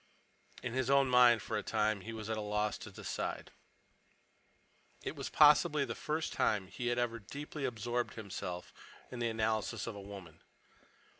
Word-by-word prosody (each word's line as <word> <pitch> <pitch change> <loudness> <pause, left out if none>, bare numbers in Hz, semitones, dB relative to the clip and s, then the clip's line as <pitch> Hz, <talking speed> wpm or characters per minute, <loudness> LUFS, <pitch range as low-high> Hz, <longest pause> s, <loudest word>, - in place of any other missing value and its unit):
In 125 - -3
his 130 0 0
own 140 -1 +4
mind, 125 -2 +6
for 110 - -3
a - - -3
time, 110 -2 0
he 115 - -7
was 110 -2 -6
at 110 - -1
a 110 - -3
loss 105 0 0
to - - -8
decide. - - -4 1.5
It - - -4
was - - -4
possibly 150 -1 +6
the 115 - -3
first 155 +5 -2
time 105 -3 +1
he 120 - -4
had 120 0 +1
ever 120 -1 0
deeply 140 +6 -6
absorbed 120 0 -2
himself 90 -4 -6 0.4
in 125 - -6
the 120 -1 +1
analysis 110 -1 -1
of 115 - -4
a 100 - -7
woman. 95 -5 -10
115 Hz, 170 wpm, -34 LUFS, 105-125 Hz, 1.5 s, mind